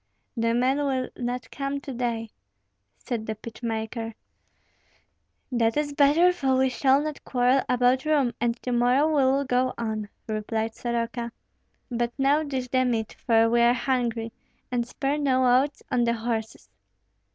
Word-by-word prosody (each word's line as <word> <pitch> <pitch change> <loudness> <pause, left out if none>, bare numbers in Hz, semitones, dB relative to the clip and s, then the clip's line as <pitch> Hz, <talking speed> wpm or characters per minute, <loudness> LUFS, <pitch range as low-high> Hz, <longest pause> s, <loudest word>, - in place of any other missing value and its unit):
"The 230 -1 +1
men 260 +3 +2
will 265 -3 -1
not 245 0 -4
come 275 0 -3
to 275 -2 -7
day," 235 -2 -2 0.7
said 230 -3 -4
the 220 - -2
pitch 225 +2 -11
maker. 225 0 -3 1.4
"That 230 0 +1
is 295 -1 -1
better, 300 +6 +5
for 270 -6 +1
we 260 0 +3
shall 265 +3 +3
not 305 -1 -5
quarrel 250 +1 +2
about 250 +1 +3
room, 285 -6 +2
and 240 0 +1
to 250 - -2
morrow 245 +5 +3
we 300 -3 +2
will 280 +1 +1
go 255 0 +1
on," 220 -2 -3 0.2
replied 220 +1 -2
Soroka; 235 0 -3 0.6
"but 240 0 -1
now 280 +3 +3
dish 265 -4 -3
the 255 +1 +2
meat, 230 -3 -1
for 225 -1 +5
we 235 +1 +3
are 240 +1 +5
hungry, 240 -2 -1 0.4
and 240 -1 -1
spare 275 +4 -2
no 255 -3 +4
oats 285 +1 -5
on 240 -1 +2
the 235 - +2
horses." 220 - -4
245 Hz, 160 wpm, -26 LUFS, 230-270 Hz, 1.4 s, better